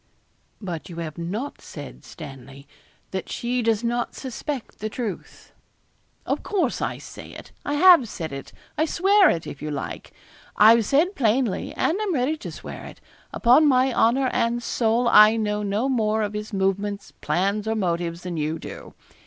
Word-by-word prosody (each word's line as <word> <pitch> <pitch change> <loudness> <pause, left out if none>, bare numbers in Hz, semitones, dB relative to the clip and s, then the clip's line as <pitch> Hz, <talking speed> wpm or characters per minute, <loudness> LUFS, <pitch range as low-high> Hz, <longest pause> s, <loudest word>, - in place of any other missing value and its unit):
'But 175 -6 -6
you 170 - -8
have 165 -1 -6
not 205 +12 -4
said, - - -10
Stanley, 140 -2 -11 0.4
that 190 - -4
she 245 +1 -1
does 225 -1 +1
not 240 0 -1
suspect 265 0 -6
the 215 - -3
truth.' 220 -3 -6 0.7
'Of - - -1
course, 350 -11 -1
I - - -2
say - - -11
it; - - -11
I 290 - -2
have 335 - +7
said 160 -7 -5
it. 135 0 -8 0.3
I 315 - +4
swear 385 +4 +4
it, 165 - -1
if 140 - -8
you 150 - -4
like. 145 -2 -5 0.5
I've 225 +1 +7
said 320 +8 +3
plainly, 230 -3 +1
and 355 - 0
I'm 395 -6 -1
ready 265 +4 +1
to - - -7
swear - - -9
it. - - -12 0.3
Upon 260 +6 +5
my 260 -1 +3
honour 255 +4 +3
and 235 +1 0
soul 235 +1 +1
I 215 -1 +7
know 210 -2 -1
no 210 +5 0
more 220 -4 +1
of 205 0 -3
his 210 +1 -5
movements, 200 +1 -1
plans, 200 +4 0
or 220 - 0
motives, 170 -3 -2
than 180 -2 -4
you 155 +1 -1
do. - - -10
220 Hz, 170 wpm, -24 LUFS, 185-255 Hz, 0.7 s, have